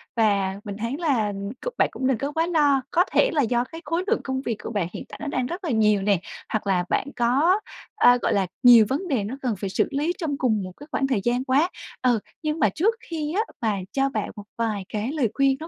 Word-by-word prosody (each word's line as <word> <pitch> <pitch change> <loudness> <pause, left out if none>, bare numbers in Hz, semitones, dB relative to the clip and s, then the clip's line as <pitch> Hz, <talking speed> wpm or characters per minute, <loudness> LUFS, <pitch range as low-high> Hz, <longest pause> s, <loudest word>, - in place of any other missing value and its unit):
Và 200 -4 +2
mình 200 -1 -6
thấy 230 +5 -2
là, 265 -11 +1
ừm, 200 0 -4 0.2
c - - -4
bạn - - +3
cũng 260 - -2
đừng 260 -4 +2
có 280 +4 -3
quá 325 +2 +1
lo, 290 -5 +3
có 355 - +4
thể - - +4
là 295 - +3
do 240 0 +1
cái 325 +6 -10
khối 335 +4 -1
lượng - - +1
công 265 0 -2
việc 230 -5 -2
của - - -5
bạn 200 -6 -1
hiện - - -6
tại - - -9
nó 295 - -4
đang 255 -3 -1
rất 355 +7 -5
là 330 - -2
nhiều 210 -3 +3
nè, 200 -3 +2 0.3
hoặc 215 -2 -1
là 180 -2 +2
bạn - - 0
có, 280 - +3 0.4
ơ, 245 -10 +6
gọi - - +1
là, 195 -2 +1 0.2
nhiều 235 -3 +9
vấn 320 +8 -1
đề 255 -10 0
nó 230 +6 -4
cần 240 -5 -1
phải 195 - -2
xử - - +1
lý 300 +5 0
trong 295 -5 -2
cùng 220 -6 +1
một 185 - -6
cái 290 - -12
khoảng 270 - 0
thời 235 -7 0
gian 245 +2 +1
quá. 280 +7 +2 0.3
Ừ, 245 -3 +3 0.2
nhưng 305 +1 -1
mà - - +4
trước 430 +8 +1
khi 315 -2 -4
á 430 - +3 0.2
mà 215 -3 +1
cho 275 0 +1
bạn 215 -5 -3
một 205 -1 -9
vài 215 -4 -1
cái 215 +5 -2
lời 275 -8 +1
khuyên 270 -1 +2
nó 320 - -7
255 Hz, 265 wpm, -24 LUFS, 215-300 Hz, 0.4 s, nhiều